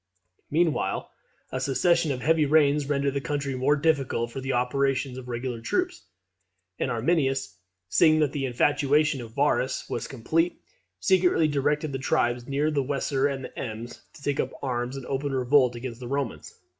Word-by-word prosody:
Meanwhile 165 +1 0 0.4
a 130 - -2
succession 150 +5 +2
of 130 -2 -3
heavy 160 -1 +3
rains 145 -1 +3
rendered 140 -1 +1
the 140 - -1
country 140 +1 -2
more 130 +3 +2
difficult 140 -6 0
for 135 - -5
the 135 +1 -2
operations 135 +1 0
of 125 - -11
regular 120 -1 -4
troops; 115 - -1 0.8
and - - 0
Arminius, 135 - 0 0.3
seeing 155 - +4
that 145 -3 +2
the 140 -2 -2
infatuation 145 +2 +2
of 115 -1 -10
Varus 140 -2 +1
was - - -3
complete, 160 +7 0 0.4
secretly 180 -4 +3
directed 145 +1 0
the 135 - -3
tribes 120 -4 0
near 145 +3 0
the 145 -2 +1
Weser 135 0 0
and 135 -2 -4
the - - -11
Ems 115 0 -6
to 160 -4 -15
take 145 -1 -1
up 130 - +1
arms 125 0 -2
in 135 - -7
open 140 +1 -2
revolt 130 -1 +3
against 120 -1 -6
the 125 - -7
Romans. 140 -1 -3
140 Hz, 170 wpm, -26 LUFS, 125-150 Hz, 0.8 s, seeing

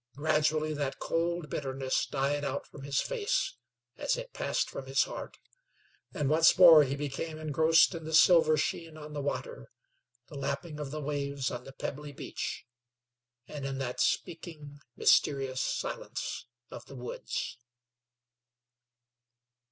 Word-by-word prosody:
Gradually 155 +1 +1
that 145 -2 -2
cold 170 0 -1
bitterness 135 -2 -2
died 145 +1 -1
out 140 0 -3
from 140 - -13
his 140 0 0
face, 460 -5 -1 0.4
as - - 0
it - - -7
passed - - -1
from - - -7
his - - +3
heart, - - -7 0.7
and 145 - -1
once 160 +4 +5
more 165 -4 +10
he 140 0 -2
became 145 +3 -4
engrossed 160 +3 +4
in 165 -2 -6
the 160 0 -1
silver 160 -2 +6
sheen 160 +1 -2
on 150 0 -9
the 145 - -3
water, 485 - -4 0.6
the - - -16
lapping 140 +3 -3
of 145 -2 -4
the 155 +2 -5
waves 140 -2 -2
on 120 0 -6
the 135 - -9
pebbly 145 +2 -5
beach, - - -5 0.8
and 145 -2 -7
in 135 -1 -3
that 125 -2 -4
speaking, 150 -4 -2 0.2
mysterious 135 -2 +3
silence - - -3 0.2
of - - -8
the 140 - -11
woods. 125 -1 -5
150 Hz, 140 wpm, -30 LUFS, 140-160 Hz, 0.8 s, more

